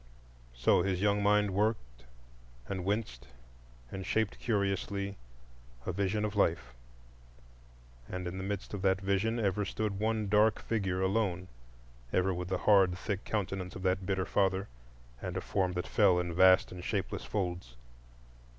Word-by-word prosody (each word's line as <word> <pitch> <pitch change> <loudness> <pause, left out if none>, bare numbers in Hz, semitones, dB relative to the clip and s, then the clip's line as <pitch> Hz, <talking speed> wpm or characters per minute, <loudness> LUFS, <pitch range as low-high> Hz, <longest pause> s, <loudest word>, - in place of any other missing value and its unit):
So - - +3
his 95 -2 0
young 105 +1 +2
mind 105 0 +3
worked 95 - -1 0.6
and 95 -2 -3
winced 95 - -2 0.6
and 95 - -5
shaped 110 +2 -1
curiously 100 -2 -1 0.7
a - - -1
vision 100 +3 0
of 105 0 -4
Life; 80 -11 +1 1.4
and 90 -1 -4
in 95 +2 -5
the - - -4
midst 100 +1 -4
of 100 - -4
that 95 0 +2
vision 100 +4 0
ever 105 -1 +1
stood 100 0 -3
one 110 -1 0
dark 105 +2 +4
figure 95 -4 -1
alone,—ever 85 - -2
with 90 0 -4
the 95 0 -1
hard, 95 -3 +4
thick 100 0 -3
countenance 95 -3 -3
of 90 - -7
that 95 0 0
bitter 95 -2 0
father, 95 -1 +1 0.5
and - - -4
a - - +1
form 95 -2 0
that 90 0 -2
fell 100 -4 +4
in 90 -1 -2
vast 95 +1 +5
and 90 -1 -8
shapeless 100 0 -2
folds. 90 - -3
95 Hz, 150 wpm, -31 LUFS, 90-105 Hz, 1.4 s, vast